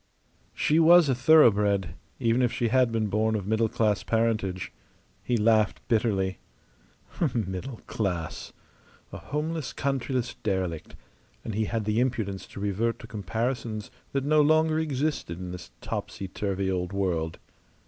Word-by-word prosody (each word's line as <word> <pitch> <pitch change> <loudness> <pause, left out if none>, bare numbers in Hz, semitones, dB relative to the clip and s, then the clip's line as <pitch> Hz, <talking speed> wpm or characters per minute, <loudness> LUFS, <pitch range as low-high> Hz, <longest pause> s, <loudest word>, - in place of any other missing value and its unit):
She 155 +2 +2
was 165 -1 +7
a - - +4
thoroughbred, 105 - +4 0.3
even 115 +2 +2
if 120 -1 +2
she 120 - 0
had 130 0 +3
been 115 -1 0
born 110 +2 +1
of 100 -3 -3
middle 110 +2 +1
class 105 -2 +1
parentage. 110 -5 -1 0.5
He 120 - 0
laughed 110 -1 +2
bitterly. 105 -5 +1 1.0
Middle 110 +3 -3
class. 90 -7 -3 0.6
A - - -7
homeless, 150 0 -3
countryless 130 -2 -1
derelict, 95 -6 -3 0.5
and 110 - -4
he 110 +2 0
had 110 0 -2
the 105 +2 +1
impudence 110 -7 -1
to - - -10
revert 105 +4 0
to - - -11
comparisons 110 +1 -3 0.2
that 135 -1 -1
no 155 +1 +4
longer 155 +1 +3
existed 145 - -2
in 90 -1 -6
this 90 0 -8
topsy 95 - -5
turvy 95 0 -2
old 90 0 -2
world. 85 -5 -1
110 Hz, 140 wpm, -27 LUFS, 100-130 Hz, 1.0 s, was